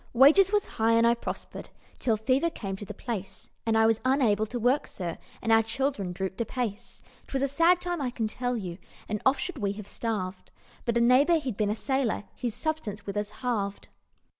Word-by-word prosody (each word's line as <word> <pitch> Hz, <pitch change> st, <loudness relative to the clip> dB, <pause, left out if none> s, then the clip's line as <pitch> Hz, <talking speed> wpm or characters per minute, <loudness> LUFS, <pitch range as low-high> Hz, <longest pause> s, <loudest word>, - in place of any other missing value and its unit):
"Wages 305 Hz, +10 st, +7 dB
was 415 Hz, -1 st, +2 dB
high, 225 Hz, +1 st, +1 dB
and 230 Hz, 0 st, +5 dB
I 235 Hz, -, +6 dB
prospered, 235 Hz, -, -6 dB, 0.3 s
Till 225 Hz, -3 st, +2 dB
fever 260 Hz, +9 st, +2 dB
came 195 Hz, -11 st, -5 dB
to 205 Hz, -, -7 dB
the 210 Hz, -, -7 dB
place, 195 Hz, -6 st, -6 dB, 0.2 s
And 225 Hz, 0 st, +3 dB
I 220 Hz, -, +5 dB
was 225 Hz, 0 st, +3 dB
unable 240 Hz, -5 st, +3 dB
to 245 Hz, -, -4 dB
work, 245 Hz, +5 st, +2 dB
sir, 175 Hz, -3 st, -5 dB, 0.2 s
And 225 Hz, -, +1 dB
our 225 Hz, 0 st, +7 dB
children 225 Hz, -4 st, -1 dB
drooped 190 Hz, +4 st, -3 dB
apace. 235 Hz, -1 st, -4 dB, 0.2 s
'Twas 270 Hz, 0 st, -1 dB
a -, -, +3 dB
sad 335 Hz, +6 st, +4 dB
time, 350 Hz, -3 st, -2 dB
I 260 Hz, -, 0 dB
can 235 Hz, -2 st, -2 dB
tell 245 Hz, +2 st, -2 dB
you, 180 Hz, -4 st, -5 dB, 0.3 s
And 210 Hz, -1 st, -2 dB
oft 265 Hz, -, +3 dB
should 360 Hz, -5 st, -4 dB
we 200 Hz, -2 st, 0 dB
have 205 Hz, -1 st, -9 dB
starved, 195 Hz, -5 st, -4 dB, 0.4 s
But 235 Hz, 0 st, +1 dB
a -, -, +3 dB
neighbour 265 Hz, +8 st, +5 dB
he'd 265 Hz, -8 st, -3 dB
been 210 Hz, 0 st, 0 dB
a 210 Hz, -, 0 dB
sailor 265 Hz, -2 st, 0 dB
His 240 Hz, -4 st, -3 dB
substance 240 Hz, -11 st, -3 dB
with 200 Hz, -, -5 dB
us 205 Hz, 0 st, -1 dB
halved. 210 Hz, -3 st, -3 dB
230 Hz, 210 wpm, -28 LUFS, 210-265 Hz, 0.4 s, Wages